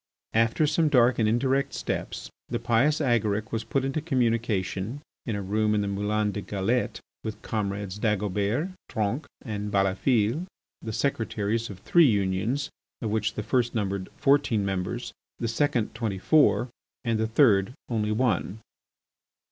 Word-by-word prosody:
After 115 +7 +3
some 155 +1 +2
dark 125 -3 +4
and 110 -1 +3
indirect 135 +4 +1
steps - - -4 0.2
the 120 - -1
pious 120 +6 +2
Agaric 110 -6 +1
was 115 -1 -2
put 135 +4 -1
into 135 +3 -1
communication 115 - 0 0.3
in 115 - -1
a 100 - -3
room 105 +2 +1
in 105 - +2
the 100 - -1
Moulin 105 +1 0
de 100 - -4
la - - -8
Galette, 105 +5 0 0.2
with 110 -1 -5
comrades 100 -2 -3
Dagobert, 105 - 0 0.2
Tronc, 110 +7 -1 0.2
and 105 -3 -4
Balafille, 105 - +1 0.3
the 110 - -5
secretaries 110 -2 -1
of 100 - -8
three 170 +5 +5
unions 105 +5 0 0.3
of 110 -3 -3
which 110 0 0
the 105 - -3
first 120 +1 +1
numbered 100 -3 -2
fourteen 135 -7 +3
members, 95 -2 -3 0.2
the 115 - -2
second 115 -1 0
twenty 110 -5 -2
four, 130 +2 +3 0.3
and 115 -2 0
the 110 - +1
third 110 -4 +4 0.2
only 110 -3 0
one. 105 -4 0
110 Hz, 150 wpm, -27 LUFS, 105-125 Hz, 0.3 s, three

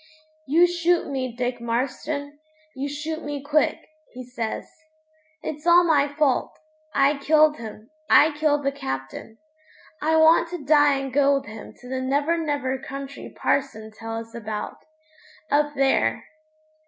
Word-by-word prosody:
'You 330 +6 +5
shoot 345 -2 +1
me, 255 -3 -3
Dick 245 0 -3
Marston; 285 +5 -3 0.4
you 275 +2 -3
shoot 315 +3 -4
me 290 -2 -5
quick,' 295 +1 0 0.3
he 255 0 -8
says. 230 -3 -4 0.8
'It's 300 +2 -5
all 345 +1 +7
my 295 -4 +3
fault. 285 -2 0 0.4
I 275 +1 +3
killed 305 +1 +4
him 220 +2 -10 0.2
I 310 +2 +6
killed 295 -1 +1
the 275 - +1
Captain. 135 - -6 0.6
I 320 +1 +2
want 320 +1 +5
to 345 -5 -7
die 290 -1 +5
and 270 -1 -4
go 280 0 +4
with 275 - -3
him 215 +1 -10
to 250 - -12
the 260 +1 -3
never 285 +5 +1
never 285 -5 -2
country 275 +1 -8
parson 220 -6 -2
tell 225 +1 -6
us 225 0 -8
about 215 -2 -5 0.7
up 295 0 +2
there!' 265 - +1
280 Hz, 145 wpm, -24 LUFS, 250-300 Hz, 0.8 s, all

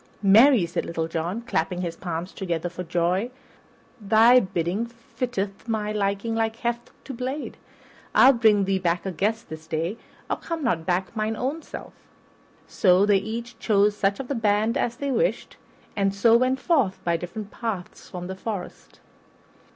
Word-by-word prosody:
"Marry," 220 +2 +6
cried 170 - -3
Little 165 -1 -2
John, 170 +7 -3
clapping 180 -4 -1
his 170 -2 -3
palms 170 +1 -5
together 175 -2 -3
for 180 +1 -7
joy, 180 +5 0 0.7
"thy 225 +4 +6
bidding 190 +2 -2
fitteth 230 -3 -5
my 215 -2 -1
liking 200 +2 -1
like 225 0 0
heft 235 0 -3 0.2
to 270 - -6
blade. 260 +4 -4 0.6
I'll 270 - +8
bring 215 -4 +4
thee 190 0 +1
back 175 -1 0
a 190 - -2
guest 220 +6 -1
this 160 0 -9
day, 165 +7 -2 0.3
or - - -1
come 330 -2 -5
not 165 -10 0
back 185 +4 -1
mine 215 0 -1
own 275 +8 -2
self." - - -9 0.9
Then 185 0 +6
they 205 -1 +4
each 225 +3 -5
chose 205 -2 +3
such 200 -1 0
of 270 - -5
the 280 - -2
band 220 0 +1
as 240 -4 0
they 280 +2 -3
wished, - - -1 0.4
and 195 -1 +1
so 225 +3 +5
went 255 +2 +2
forth 260 - +1
by 170 -1 +1
different 180 +5 -6
paths 215 -7 -5
from 180 -1 -6
the 190 +1 -5
forest. 195 -1 -7
205 Hz, 165 wpm, -25 LUFS, 180-235 Hz, 0.9 s, I'll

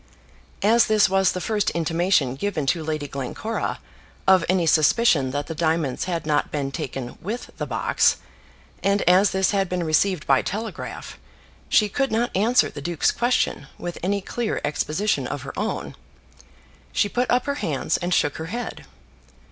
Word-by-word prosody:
As 230 +3 +5
this 215 -1 +4
was 195 -1 +3
the 185 - -4
first 210 +1 0
intimation 165 -4 +1
given 165 -2 -2
to 160 +4 0
Lady 155 -2 -3
Glencora 140 - -3 0.5
of 190 -2 +6
any 185 -2 +2
suspicion 155 - +4
that 145 +2 -3
the 160 - -5
diamonds 160 -4 0
had 170 -4 -3
not 150 -1 +1
been 140 -2 -3
taken 130 -2 -5
with 220 +7 -5
the - - -3
box, - - +2 0.6
and 200 0 +2
as 185 +3 +5
this 190 0 +1
had 195 -2 0
been 180 -1 -1
received 160 -1 +1
by 135 -1 +4
telegraph, 220 +3 -6 0.5
she 210 - +4
could 270 +5 -1
not 230 +2 0
answer 225 +6 +3
the 145 - -8
duke's 170 +1 +1
question 240 +1 0
with 175 0 -6
any 200 +3 0
clear 235 +3 -2
exposition 155 +7 -1
of - - -5
her - - -7
own. - - -3 1.0
She 205 - +2
put 245 +5 -1
up 250 0 +2
her 280 -1 -1
hands 155 0 0
and 175 +1 -3
shook 145 -4 +1
her 160 - -5
head. 240 +7 -5
180 Hz, 165 wpm, -23 LUFS, 155-210 Hz, 1.0 s, of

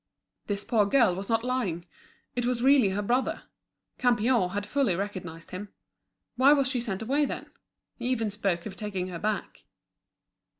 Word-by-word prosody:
This 205 -1 -2
poor 215 -4 +2
girl 230 -4 +4
was 195 +2 -5
not 225 0 +2
lying; 220 -10 -1 0.5
it 245 - 0
was 245 -1 0
really 265 -6 +6
her 200 +2 -1
brother. 245 +5 0 0.6
Campion 235 -4 +3
had 205 +2 -3
fully 250 -5 +1
recognised 180 -4 -5
him. 200 +3 -6 0.7
Why 270 +3 +7
was 275 -3 +3
she 255 -2 0
sent 220 -3 -3
away, 280 +6 +2
then? - - -6 0.5
He 240 - -4
even 225 -4 0
spoke 195 -4 -1
of 205 -3 -6
taking 190 -3 -3
her 175 -2 -6
back. 210 +1 -3
210 Hz, 165 wpm, -28 LUFS, 195-250 Hz, 0.7 s, Why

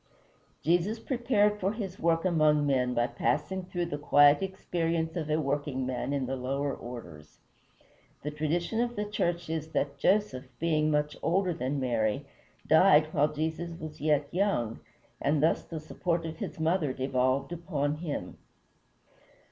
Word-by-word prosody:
Jesus 175 +7 +2
prepared 225 -4 +1
for 195 +2 0
his 195 -4 -5
work 165 +1 +2
among 155 -4 +3
men 125 -3 +1
by 120 - +3
passing 180 +8 -1
through 175 -1 -2
the 145 -3 -4
quiet 145 0 +6
experience 165 -3 -2
of 160 -3 -3
a 155 +1 +2
workingman 135 -3 -2
in 140 -2 0
the 130 +1 -2
lower 135 +2 -2
orders. 90 -13 -10 0.9
The 150 - -3
tradition 170 +9 -1
of 240 0 -1
the 210 -1 -2
church 175 -4 -1
is 160 0 -4
that 140 0 -1
Joseph, 195 -7 +1
being 155 -2 +1
much 150 -1 0
older 180 +1 +1
than 140 0 -2
Mary, 120 0 0 0.4
died 155 -1 +5
while 150 +1 +3
Jesus 160 +2 -3
was 155 -1 -8
yet 150 -1 +2
young, 170 - 0 0.4
and 150 0 +2
thus 160 - +3
the 165 - -6
support 165 +2 -2
of 160 0 -5
his - - -6
mother 160 -3 +1
devolved 130 +2 0
upon 155 -4 -2
him. 160 -2 -5
155 Hz, 150 wpm, -29 LUFS, 140-175 Hz, 0.9 s, quiet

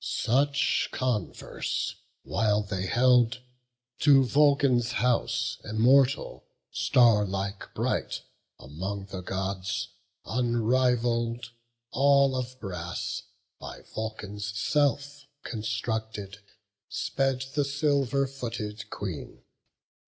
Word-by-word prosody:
Such, 140 +4 +1
converse 125 -5 -2 0.3
while 105 +1 +1
they 95 -2 -3
held, 125 +1 +4 0.6
to 140 -2 +6
Vulcan's 140 -4 +3
house, 125 +2 0
Immortal, 125 +5 +3 0.3
starlike 100 -4 +2
bright, - - -1 0.3
among 95 +8 -5
the 95 - -5
Gods 95 +1 -3 0.4
Unrivall'd, 120 0 +1 0.4
all 140 0 +4
of 130 0 -4
brass, 90 -5 -4 0.4
by - - -9
Vulcan's 105 -2 -5
self 145 +3 0 0.2
Constructed, 110 -2 -4 0.5
sped 135 -1 -1
the 145 - +2
silver 140 -2 +1
footed 115 -5 -6
Queen. 90 -8 -6
120 Hz, 80 wpm, -28 LUFS, 105-135 Hz, 0.6 s, to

